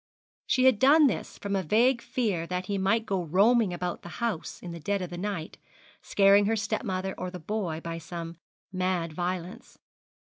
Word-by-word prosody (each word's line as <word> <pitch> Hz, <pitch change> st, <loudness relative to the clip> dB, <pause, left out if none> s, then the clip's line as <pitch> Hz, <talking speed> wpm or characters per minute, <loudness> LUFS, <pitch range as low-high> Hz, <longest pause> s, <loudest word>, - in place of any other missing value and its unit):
She 255 Hz, -, +2 dB
had 260 Hz, -5 st, +5 dB
done 295 Hz, +4 st, +6 dB
this 270 Hz, -, -1 dB
from 200 Hz, -1 st, -3 dB
a 195 Hz, -, +1 dB
vague 235 Hz, +8 st, +3 dB
fear 225 Hz, -9 st, -1 dB
that 180 Hz, +1 st, -3 dB
he 200 Hz, 0 st, -2 dB
might 225 Hz, +4 st, +1 dB
go 195 Hz, -3 st, -1 dB
roaming 200 Hz, +5 st, +3 dB
about 175 Hz, 0 st, -4 dB
the 175 Hz, -, -10 dB
house 225 Hz, -8 st, -3 dB
in 175 Hz, -, -8 dB
the 170 Hz, -, -7 dB
dead 200 Hz, +6 st, -1 dB
of 180 Hz, -2 st, -5 dB
the 175 Hz, -, -6 dB
night, 185 Hz, -5 st, -4 dB, 0.4 s
scaring 200 Hz, 0 st, +4 dB
her 225 Hz, -, +2 dB
stepmother 190 Hz, -3 st, -2 dB
or 185 Hz, -, -3 dB
the 180 Hz, -, -7 dB
boy 175 Hz, -3 st, -3 dB
by 165 Hz, 0 st, -5 dB
some 170 Hz, 0 st, -7 dB, 0.3 s
mad 185 Hz, -3 st, -1 dB
violence. 180 Hz, +6 st, -5 dB
190 Hz, 185 wpm, -28 LUFS, 175-220 Hz, 0.4 s, done